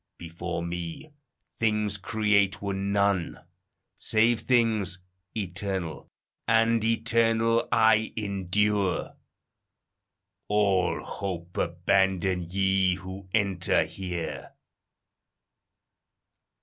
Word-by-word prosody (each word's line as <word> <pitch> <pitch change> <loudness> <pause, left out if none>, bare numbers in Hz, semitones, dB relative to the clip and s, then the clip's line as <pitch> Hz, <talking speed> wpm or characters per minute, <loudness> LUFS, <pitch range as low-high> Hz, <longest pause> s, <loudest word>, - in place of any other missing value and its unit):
Before 85 0 -5
me 85 - -6 0.5
things 105 -2 +1
create 100 -1 +1
were 100 -1 -3
none, 100 -2 0 0.6
save 115 +1 +2
things 110 -7 +1 0.4
Eternal, 95 -3 -4 0.4
and 115 0 +3
eternal 115 0 +2
I 110 -1 +4
endure. 100 -1 0 1.3
All 100 -4 +1
hope 90 -3 -6
abandon, 95 +1 +1
ye 95 -1 +2
who 95 +1 -9
enter 100 -5 +1
here." 90 -3 -6
100 Hz, 70 wpm, -27 LUFS, 90-110 Hz, 1.3 s, I